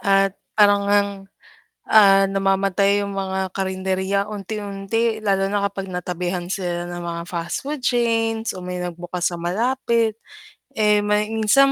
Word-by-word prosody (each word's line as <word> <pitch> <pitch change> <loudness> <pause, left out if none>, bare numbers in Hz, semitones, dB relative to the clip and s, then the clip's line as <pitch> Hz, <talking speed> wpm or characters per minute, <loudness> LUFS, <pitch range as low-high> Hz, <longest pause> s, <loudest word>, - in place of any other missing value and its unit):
At 195 -2 +2 0.2
parang 205 -1 +5
ngang, 200 0 +3 0.8
ah, 195 -2 +7
namamatay 195 +1 +2
yung 200 0 -5
mga 190 -1 -2
karenderya 190 +1 -1
unti-unti, 210 +2 -2
lalo 195 -1 +2
na 200 0 0
kapag 195 -1 -6
natabihan 180 0 -3
sila 175 -3 -2
ng 175 0 -6
mga 170 -1 -4
fast 170 +4 -4
food 290 0 -4
chains 225 -2 +1
o - - -7
may 180 0 -4
nagbukas 175 0 -3
sa - - -4
malapit. 230 +4 0 0.6
Eh, 210 -1 +3
may 210 0 +1
minsan 225 +5 +4
195 Hz, 140 wpm, -22 LUFS, 185-215 Hz, 0.8 s, ah